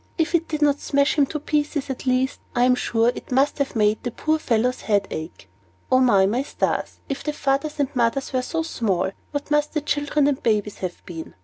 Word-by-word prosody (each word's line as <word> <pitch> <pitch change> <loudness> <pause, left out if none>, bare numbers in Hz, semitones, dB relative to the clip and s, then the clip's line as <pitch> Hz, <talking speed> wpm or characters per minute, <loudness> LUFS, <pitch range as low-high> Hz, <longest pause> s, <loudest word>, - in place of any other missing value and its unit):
If 330 0 0
it 335 -1 +2
did 305 -1 -1
not 290 -1 +3
smash 280 0 +2
him 290 -3 +4
all - - -10
to 300 - -1
pieces, 295 -1 -1
at 265 - -7
least, 255 +1 +1 0.2
I 245 - +3
am 250 0 +5
sure, 235 -2 +2
it - - -10
must 270 +4 +2
have 280 -2 -1
made 210 -1 +2
the 245 - -3
poor 310 +6 0
little - - -15
fellow's 245 +2 +1
head 200 -2 +1
ache. 155 - -7 0.4
And 255 -1 +5
O, 195 -3 +5
my 225 +6 +1
stars! 280 - -2
if 275 - -4
the 300 - -2
fathers 285 +2 -1
and 285 -1 -1
mothers 245 +3 0
were 255 - +2
so 325 +5 -2
small, 195 - -1 0.2
what 290 0 -5
must 295 +1 +1
the 305 - +1
children 290 0 +1
and 285 -2 +1
babies 210 -3 0
have 180 -2 -5
been? 165 -2 -8
265 Hz, 230 wpm, -23 LUFS, 230-295 Hz, 0.4 s, am